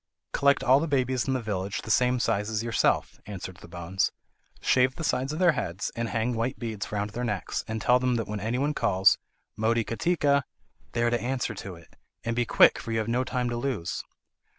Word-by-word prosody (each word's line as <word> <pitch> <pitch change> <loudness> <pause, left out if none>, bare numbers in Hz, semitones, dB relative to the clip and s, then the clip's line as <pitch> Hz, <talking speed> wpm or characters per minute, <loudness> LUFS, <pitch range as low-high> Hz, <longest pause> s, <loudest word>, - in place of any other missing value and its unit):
"Collect 140 0 +3
all 130 +3 +6
the 165 - -1
babies 130 -3 0
in 135 - +1
the 125 - -2
village 95 -2 -3
the 110 - -3
same 125 +1 +3
size 105 -2 0
as 110 0 -1
yourself," 115 -1 +1
answered 95 -3 -7
the - - -13
bones; 85 +2 -1 0.5
"shave 130 0 +3
the 160 - -5
sides 130 -1 0
of 155 - -4
their 175 -1 +5
heads, 100 - -3
and 115 0 -2
hang 115 +2 0
white 115 +2 -1
beads 110 -4 -5
round 105 0 -2
their 120 +3 -4
necks, 105 -5 -2
and 110 0 -3
tell 125 +1 +5
them 125 -1 +1
that 115 -3 -2
when 105 0 -4
anybody 125 +8 0
calls 95 -6 +3 0.4
'Motikatika,' 115 +7 +2 0.5
they 120 - 0
are 120 - +2
to 120 -2 0
answer 125 -1 -1
to 95 -2 -7
it. 85 0 -18 0.3
And 115 0 -2
be 120 -1 0
quick - - +6
for 115 - -6
you 115 - 0
have 110 0 -1
no 120 +2 +1
time 125 -1 -1
to - - -2
lose." 120 -9 -2
115 Hz, 215 wpm, -27 LUFS, 105-130 Hz, 0.5 s, all